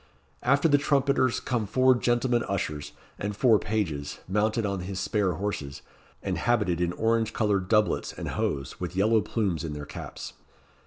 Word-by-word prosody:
After 140 +5 +3
the 145 -2 +4
trumpeters 140 -3 +2
come 120 -5 -2
four 130 +5 +4
gentlemen 120 0 +1
ushers, 75 -7 -3 0.3
and 100 +1 -3
four 110 -1 +4
pages, 80 -10 -2
mounted 105 +3 +1
on 100 -1 -1
his 95 +1 -5
spare 100 -3 0
horses, 80 -6 -4 0.4
and - - -2
habited 85 -1 +1
in 85 0 +1
orange 115 +1 +1
coloured 100 -4 +1
doublets 105 0 +2
and - - -6
hose, 70 -2 -2
with 90 0 -5
yellow 110 +3 +3
plumes 95 -9 -1
in 80 -2 -4
their 75 0 -6
caps. - - -8
105 Hz, 160 wpm, -27 LUFS, 90-120 Hz, 0.4 s, the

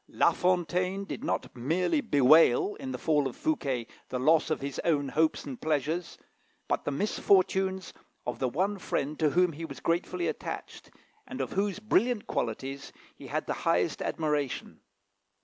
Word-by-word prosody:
"La - - +3
Fontaine 180 +2 0
did 225 - -6
not 300 - -2
merely 175 - +1
bewail, 165 - +5
in 265 -1 -5
the - - -3
fall 150 -3 +2
of 130 - -7
Fouquet, 135 - -1 0.2
the 130 - -2
loss 155 +6 +3
of 155 - 0
his 140 0 -4
own 145 -5 +1
hopes 160 +2 +1
and 135 -4 -7
pleasures, 155 +3 -1 0.5
but - - -1
the - - 0
misfortunes 190 +2 +1 0.3
of 125 - -3
the 130 - +1
one 190 +9 -1
friend 150 -3 -2
to 155 - +3
whom 180 +2 +3
he 160 +3 -7
was 140 -4 -7
gratefully 175 - -1
attached, - - -6 0.4
and 260 - -7
of - - -2
whose 200 0 0
brilliant 215 +2 +1
qualities 135 +4 -3 0.2
he - - -11
had - - -2
the - - -1
highest - - +1
admiration. 150 -4 -2
165 Hz, 165 wpm, -29 LUFS, 140-190 Hz, 0.5 s, bewail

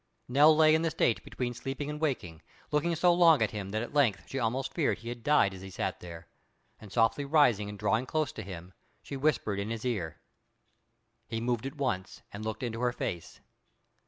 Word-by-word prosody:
Nell 145 +5 +6
lay 155 -1 +6
in 160 - +3
the 165 - +1
state 135 -7 +1
between 125 -1 -4
sleeping 135 +4 -5
and 150 +1 -5
waking, 90 - -2 0.3
looking 150 +3 +1
so 175 +2 +4
long 165 -7 +6
at 105 - -1
him 100 -3 -5
that 110 +3 -2
at 120 - -8
length 115 -10 +2
she 135 - -4
almost 125 +3 -1
feared 160 -5 +1
he 115 - -8
had 120 0 -6
died 130 -7 +3
as 95 - -10
he 95 - -8
sat 95 - -3
there; 85 -1 -10 0.5
and 105 -3 -12
softly 115 +5 +2
rising 130 -9 +3
and 105 - -7
drawing 110 +4 0
close 155 -1 0
to - - -7
him, 90 -2 -9 0.3
she 140 - -7
whispered 135 -8 0
in 100 +2 -3
his 115 +1 -4
ear. 85 -11 -2 1.1
He 115 0 -3
moved 120 +1 -1
at 140 - -9
once, 120 -10 -3
and 100 +1 -6
looked 110 +2 -4
into 115 -2 -3
her 125 -1 +2
face. 85 -7 -5
120 Hz, 210 wpm, -30 LUFS, 105-145 Hz, 1.1 s, Nell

